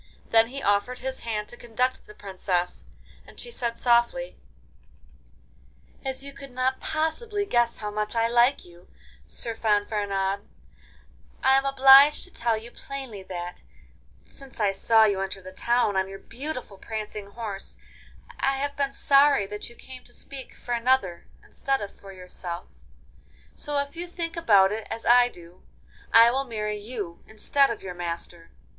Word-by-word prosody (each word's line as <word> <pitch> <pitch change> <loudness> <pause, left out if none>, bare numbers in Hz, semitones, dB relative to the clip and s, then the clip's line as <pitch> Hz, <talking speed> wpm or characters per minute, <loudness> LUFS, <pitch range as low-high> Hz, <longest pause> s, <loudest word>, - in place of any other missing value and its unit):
Then 225 0 +6
he 275 +3 -7
offered 205 +5 +1
his 265 0 -4
hand 215 -2 -3
to - - -8
conduct 245 +2 -2
the 210 - -13
Princess, 185 -2 -2 0.4
and - - -15
she 480 - -5
said 235 - -2
softly: 240 - +2 1.7
'As 265 0 -3
you 280 0 -9
could 275 0 -11
not 255 +1 -1
possibly 405 +7 -1
guess 240 -9 +2
how 210 -1 -4
much 210 +2 -3
I 230 0 +3
like 240 +3 +3
you, 175 0 -17 0.4
Sir 230 - -5
Fanfaronade, 205 -3 0 1.0
I 265 0 +6
am 270 0 +2
obliged 275 +2 +7
to 370 - -12
tell 230 -1 0
you 230 +2 -9
plainly 265 -8 -7
that, 180 -2 -6 0.7
since 270 -3 -13
I 205 -2 +3
saw 220 +3 +4
you 200 -2 +1
enter 195 0 -4
the 185 0 -10
town 235 +1 +1
on 190 0 +1
your 195 - -7
beautiful 250 -4 -7
prancing 215 -2 -6
horse, 200 -2 -6 0.6
I 270 - +2
have 285 +1 -3
been 280 -1 0
sorry 275 -5 +4
that 210 +3 -6
you 235 - -15
came 255 0 -12
to 240 - -16
speak 270 -2 -9
for 245 - -5
another 235 -7 +1 0.2
instead 270 -1 -1
of 205 - -6
for 195 - -12
yourself. 180 -1 -7 0.9
So, 295 -1 -3
if 280 +2 -2
you 350 +1 -5
think 340 -1 -5
about 205 - +5
it 215 0 -4
as 225 - -5
I 245 0 +6
do, 175 -3 -15 0.5
I 230 +1 +8
will 270 +2 0
marry 210 -3 -3
you 205 -6 -6
instead 275 +6 +2
of 230 - -5
your 185 -2 -5
master. 170 -1 -6
230 Hz, 165 wpm, -26 LUFS, 200-270 Hz, 1.7 s, I